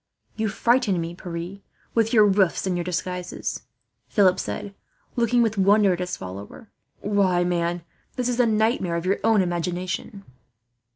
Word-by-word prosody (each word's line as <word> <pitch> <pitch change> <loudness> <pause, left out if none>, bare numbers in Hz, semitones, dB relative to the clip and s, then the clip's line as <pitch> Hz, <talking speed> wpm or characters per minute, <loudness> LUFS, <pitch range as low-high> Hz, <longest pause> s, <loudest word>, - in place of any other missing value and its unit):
"You 220 -1 -1
frighten 230 -2 +2
me, 165 +1 -4
Pierre, 175 +2 -6 0.3
with 225 -1 +2
your 215 -3 +6
roofs 195 -3 +2
and 185 -2 0
your 175 - -1
disguises," 180 0 -4 0.5
Philip 185 -3 +3
said, 205 -1 -5 0.4
looking 240 0 +3
with 220 -2 -1
wonder 200 0 +5
at 175 - -4
his 180 0 -3
follower. 100 - -9 0.3
"Why, 195 -4 +2
man, 175 -1 -1 0.3
this 250 -1 -1
is 245 0 -1
a 245 - +5
nightmare 215 -5 +1
of 170 +1 -3
your 195 +2 +1
own 220 -3 +4
imagination." 180 +3 -3
190 Hz, 155 wpm, -24 LUFS, 175-220 Hz, 0.5 s, your